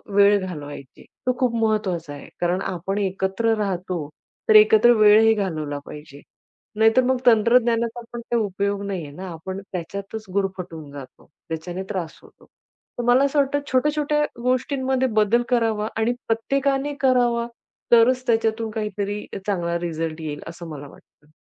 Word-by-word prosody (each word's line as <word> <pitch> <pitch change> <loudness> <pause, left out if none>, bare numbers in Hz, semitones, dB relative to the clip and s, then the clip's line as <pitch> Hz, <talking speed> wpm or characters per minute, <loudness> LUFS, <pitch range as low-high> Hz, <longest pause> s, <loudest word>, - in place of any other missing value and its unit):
वेळ 205 0 +6
घालवायचे. 145 -6 -9 0.2
तो 255 - +3
खूप 250 -3 +1
महत्त्वाचा 185 -8 -1
आहे. 145 - -11
कारण 180 +2 +1
आपण 190 +2 -3
एकत्र 195 +3 0
राहतो, 180 -6 -3 0.4
तर 215 - +6
एकत्र 215 +2 +7
वेळही 215 +1 +7
घालवला 155 -8 -3
पाहिजे. 150 -1 -11 0.6
नाहीतर 225 +3 +4
मग 260 +1 +2
तंत्रज्ञानाचा 235 0 +3
पण 240 - -5
काही 235 0 -1
उपयोग 200 +1 -2
नाहीये 170 -7 -4
ना. 185 +6 -8
आपण 185 +4 -6
त्याच्यातच 200 +5 -6
गुरफटून 180 -6 -3
जातो. 135 -3 -12 0.2
त्याच्याने 175 +4 -5
त्रास 180 -6 -4
होतो. - - -20 0.5
तर - - -1
मला 250 +3 +5
असं 280 +1 +1
वाटतं, 285 +1 +1
छोट्या-छोट्या 295 +2 +1 0.2
गोष्टींमध्ये 260 +1 0
बदल 230 +3 +3
करावा 225 -3 +1
आणि 225 +2 +1
प्रत्येकाने 275 +5 0
करावा. 245 -3 +2 0.4
तरच 250 +2 +5
त्याच्यातून 225 -1 +1
काहीतरी 210 -1 -3
अ, - - -3
चांगला 170 -3 -1
रिझल्ट 165 -1 -4
येईल, 150 -2 -5
असं 170 0 -9
मला 145 -2 -8
वाटतं. 150 - -21
210 Hz, 145 wpm, -23 LUFS, 175-235 Hz, 0.6 s, एकत्र